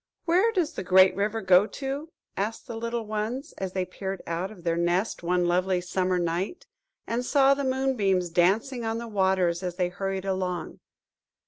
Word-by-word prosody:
"Where 370 +7 +3
does 345 -6 0
the - - -4
great 185 +1 +6
river 210 +3 -1
go 190 +2 +5
to?" 275 +5 -5 0.3
asked 215 +3 -3
the 230 - -7
little 230 0 -3
ones, 220 +7 -3
as 190 -1 -3
they 185 -1 -1
peered 190 +1 -6
out 170 +3 -2
of 195 -5 -13
their 170 -1 +1
nest 175 +4 0
one 175 0 +1
lovely 180 +1 +1
summer 180 +1 0
night, 175 - -2 0.4
and 235 +2 -2
saw 275 +1 +4
the 280 0 -2
moonbeams 240 -10 +1
dancing 215 +9 +2
on 225 0 -1
the 235 0 -5
waters 190 -4 +1
as 180 -2 -4
they 180 -1 0
hurried 195 +1 -3
along. 185 -3 -3
195 Hz, 180 wpm, -27 LUFS, 180-235 Hz, 0.4 s, great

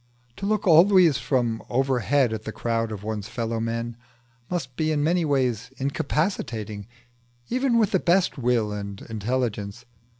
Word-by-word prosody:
To 195 - -3
look 215 0 0
always 170 - +6
from 120 -3 0
overhead 130 -1 +2
at 110 - -4
the 110 - -5
crowd 115 0 -1
of 105 -2 -6
one's 105 -1 -4
fellow 115 0 -2
men 115 +1 -3 0.5
must 135 -8 -3
be 155 +2 0
in 145 -1 +1
many 170 +3 +2
ways 125 -5 0
incapacitating, 125 - -2 0.6
even 255 -1 +2
with 220 -4 +3
the 190 - +3
best 180 +2 +2
will 120 -5 +1
and 100 -1 -5
intelligence. 110 -1 -3
125 Hz, 145 wpm, -25 LUFS, 110-155 Hz, 0.6 s, always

